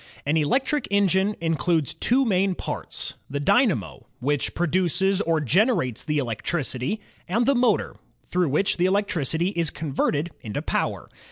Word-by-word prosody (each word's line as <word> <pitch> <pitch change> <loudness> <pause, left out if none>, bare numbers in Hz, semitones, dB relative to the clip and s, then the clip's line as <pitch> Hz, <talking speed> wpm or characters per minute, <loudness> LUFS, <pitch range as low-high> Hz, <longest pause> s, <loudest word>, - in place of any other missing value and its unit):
An 145 +3 +1
electric 260 - +1
engine 200 0 +2
includes 165 -2 0
two 260 +3 +2
main 190 -3 +2
parts: - - -5 0.2
the 140 +1 -3
dynamo, 230 - +1
which 145 +2 -1
produces 185 +3 +2
or 165 -5 +1
generates 150 - +1
the 150 -1 -1
electricity, 130 - -1 0.3
and 230 +7 +1
the 275 - +4
motor, 245 -5 +1 0.3
through 180 -3 0
which 155 +8 +1
the 180 +1 +3
electricity 175 -4 0
is 170 -5 0
converted 150 +2 -1
into 105 -3 -4
power. - - -2
175 Hz, 140 wpm, -24 LUFS, 150-200 Hz, 0.3 s, the